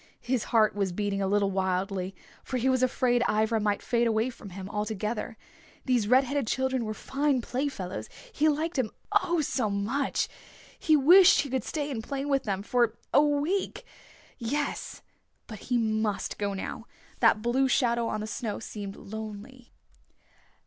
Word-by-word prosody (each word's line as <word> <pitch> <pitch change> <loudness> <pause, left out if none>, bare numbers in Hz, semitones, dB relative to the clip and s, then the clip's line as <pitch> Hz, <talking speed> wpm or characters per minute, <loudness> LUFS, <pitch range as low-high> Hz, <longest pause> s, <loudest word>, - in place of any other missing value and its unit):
His 250 -2 0
heart 220 -3 +3
was 195 -2 -1
beating 200 +1 -2
a 195 - +1
little 200 0 +2
wildly. 190 0 -1 0.3
For 255 - -3
he 250 +2 0
was 255 -1 +2
afraid 245 -1 +2
Ivra 220 +1 +2
might 205 -1 0
fade 235 -1 +1
away 225 +3 +1
from 205 - -11
him 190 +1 -7
altogether. 210 +2 -3 0.5
These 245 -5 +2
red 255 +4 +5
headed 275 -2 -2
children 260 -1 0
were 215 0 -4
fine 275 +2 0
playfellows. 245 -7 -4 0.2
He 310 -3 +3
liked 310 +2 -1
them, 250 -5 +1 0.2
oh, 345 -2 +2
so 250 -6 0
much! 220 +8 -1 0.5
He 315 -5 +4
wished 350 +7 +7
he 280 - -6
could 260 -1 0
stay 295 -2 -3
and 225 -4 -4
play 275 +2 -3
with 275 -2 +1
them 195 -2 -2
for 235 0 +1 0.2
a 285 - +7
week. 310 +11 0 0.5
Yes. 280 +5 -3 0.4
But 215 -3 -9
he 245 - +3
must 220 -2 -1
go 200 -1 -1
now. 225 +4 -6 0.3
That 225 -2 +4
blue 260 +3 +2
shadow 235 -2 +2
on 215 - -2
the - - -3
snow 215 0 -4
seemed 205 -3 -7
lonely. 220 +4 -9
235 Hz, 165 wpm, -28 LUFS, 210-265 Hz, 0.5 s, wished